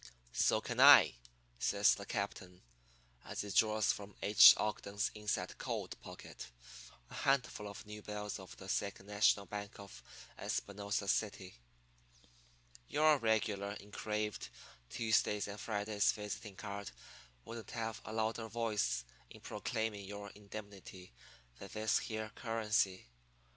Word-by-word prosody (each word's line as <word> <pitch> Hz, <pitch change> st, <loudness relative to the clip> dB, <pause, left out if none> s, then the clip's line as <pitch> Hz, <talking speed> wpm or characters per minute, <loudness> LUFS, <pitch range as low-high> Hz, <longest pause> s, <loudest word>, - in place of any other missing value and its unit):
"'So -, -, +3 dB
can -, -, -5 dB
I,' -, -, +9 dB, 0.5 s
says 65 Hz, -, +4 dB
the -, -, -7 dB
captain, 90 Hz, 0 st, -4 dB, 0.6 s
as -, -, -4 dB
he 105 Hz, -, -6 dB
draws 110 Hz, +1 st, +3 dB
from 100 Hz, -1 st, -7 dB
H. 105 Hz, +1 st, +10 dB
Ogden's 105 Hz, +2 st, -1 dB
inside 105 Hz, -1 st, -2 dB
coat -, -, -3 dB
pocket -, -, -10 dB, 0.6 s
a -, -, -10 dB
handful 125 Hz, -6 st, 0 dB
of 100 Hz, +1 st, -9 dB
new 105 Hz, 0 st, -8 dB
bills 105 Hz, -1 st, -5 dB
of 95 Hz, -, -11 dB
the 95 Hz, -, -10 dB
Second 100 Hz, 0 st, -2 dB
National 105 Hz, 0 st, +3 dB
Bank 100 Hz, 0 st, -6 dB
of 100 Hz, -1 st, -11 dB, 0.4 s
Espinosa 100 Hz, 0 st, -2 dB
City. 100 Hz, -3 st, -1 dB, 1.3 s
'Your 155 Hz, -1 st, +4 dB
regular 110 Hz, -3 st, 0 dB
engraved 105 Hz, 0 st, -4 dB, 0.4 s
Tuesdays 110 Hz, -2 st, +1 dB
and 100 Hz, +1 st, -7 dB
Fridays 105 Hz, -1 st, +1 dB
visiting 105 Hz, -1 st, -6 dB
card 100 Hz, 0 st, -6 dB, 0.6 s
wouldn't 115 Hz, -1 st, -8 dB
have 115 Hz, -1 st, -4 dB
a -, -, -7 dB
louder 110 Hz, +1 st, -1 dB
voice 105 Hz, -, -1 dB, 0.2 s
in -, -, -12 dB
proclaiming 110 Hz, -3 st, -3 dB
your 100 Hz, 0 st, -7 dB
indemnity 100 Hz, -, -10 dB, 0.5 s
than -, -, -9 dB
this 110 Hz, +1 st, +2 dB
here 110 Hz, -1 st, -4 dB
currency. 110 Hz, -4 st, 0 dB
105 Hz, 125 wpm, -35 LUFS, 100-110 Hz, 1.3 s, H